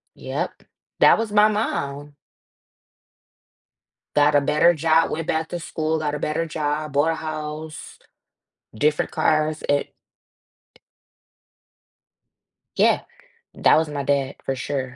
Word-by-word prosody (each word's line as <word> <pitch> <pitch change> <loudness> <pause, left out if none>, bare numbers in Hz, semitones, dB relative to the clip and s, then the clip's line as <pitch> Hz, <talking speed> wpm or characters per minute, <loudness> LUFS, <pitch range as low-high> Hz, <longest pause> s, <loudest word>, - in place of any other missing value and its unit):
Yep, - - -5 0.4
that - - +7
was 225 -2 -3
my 210 0 +6
mom. 145 -9 -3 2.0
Got 145 0 +4
a 145 - +5
better 160 +5 +4
job, 160 +1 +2
went 165 0 -3
back 160 0 -1
to 175 - -4
school, 160 0 -2
got 150 -1 -2
a - - -4
better 155 +3 -1
job, 150 -1 -3
bought 150 +3 +3
a - - -2
house, 155 0 -7 0.8
different 150 +6 +1
cars 155 0 +1
and 145 0 +1 2.9
Yeah, - - +3 0.5
that - - +4
was 160 -1 0
my 145 -1 -4
dad 140 -1 0
for 135 - -1
sure. 130 -1 -4
155 Hz, 120 wpm, -22 LUFS, 145-160 Hz, 2.9 s, that